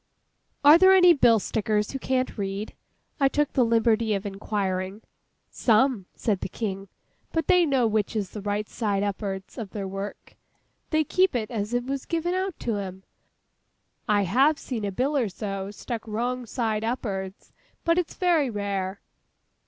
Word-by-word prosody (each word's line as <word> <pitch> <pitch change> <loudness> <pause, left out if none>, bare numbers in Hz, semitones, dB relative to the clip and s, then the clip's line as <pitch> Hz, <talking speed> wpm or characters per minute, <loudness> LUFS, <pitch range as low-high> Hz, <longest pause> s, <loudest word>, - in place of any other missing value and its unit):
'Are 300 +3 +9
there 380 +1 +7
any 360 -2 +7
bill 240 -6 +5
stickers 210 0 -1
who 270 - -4
can't 260 0 -1
read?' 200 0 -4 0.5
I 275 - +5
took 295 +1 0
the 255 - +4
liberty 230 -1 +2
of 195 - -4
inquiring. 195 0 -3 0.5
'Some,' 225 -3 +2
said 205 -5 -1
the - - -3
King. 195 -1 -4 0.4
'But 325 -1 0
they 360 -3 +4
know 265 -4 +2
which 215 -1 0
is 205 -3 -2
the 210 - -7
right 205 +1 -2
side 205 -3 -1
up'ards 195 +2 -4
of 215 -4 -5
their 195 0 -5
work. 195 +2 -7 0.5
They 310 -1 +2
keep 370 +1 +2
it 220 -2 -2
as 220 0 -2
it's 260 +2 -2
given 340 +1 -1
out 375 -1 -2
to 225 -3 -1
'em. 190 -1 -6 1.1
I 205 -1 +4
have 270 - +3
seen 230 -7 -4
a 200 - -2
bill 265 +9 0
or 245 -7 +1
so 195 0 -5
stuck 225 +2 -6
wrong 240 +3 -2
side 220 -2 -1
up'ards. 200 -5 -4 0.3
But 335 +1 +3
it's 350 - -3
very 340 -7 +2
rare. 200 -2 -3
220 Hz, 165 wpm, -26 LUFS, 200-270 Hz, 1.1 s, Are